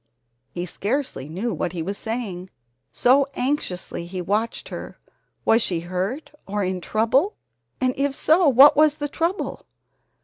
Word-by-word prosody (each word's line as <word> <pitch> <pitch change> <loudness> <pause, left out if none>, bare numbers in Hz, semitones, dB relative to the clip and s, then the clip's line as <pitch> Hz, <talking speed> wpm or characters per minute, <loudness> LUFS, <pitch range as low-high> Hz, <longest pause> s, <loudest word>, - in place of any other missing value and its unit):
He 175 +6 -4
scarcely 205 - -3
knew 200 +9 -2
what 175 - -3
he 170 -3 -3
was 195 +4 -3
saying, 205 -6 -4 0.4
so 270 +3 +4
anxiously 245 - -2
he 185 +1 -5
watched 210 +6 -2
her. - - -7 0.5
Was 225 +1 +4
she 175 -6 -1
hurt 185 - -3 0.2
or 205 +1 -1
in 185 -1 -2
trouble, 250 - +1 0.4
and 255 0 +1
if 275 0 0
so, 320 +2 +4
what 275 +3 +8
was 305 0 +5
the 290 -1 -3
trouble? 335 +6 -3
225 Hz, 145 wpm, -23 LUFS, 185-280 Hz, 0.5 s, what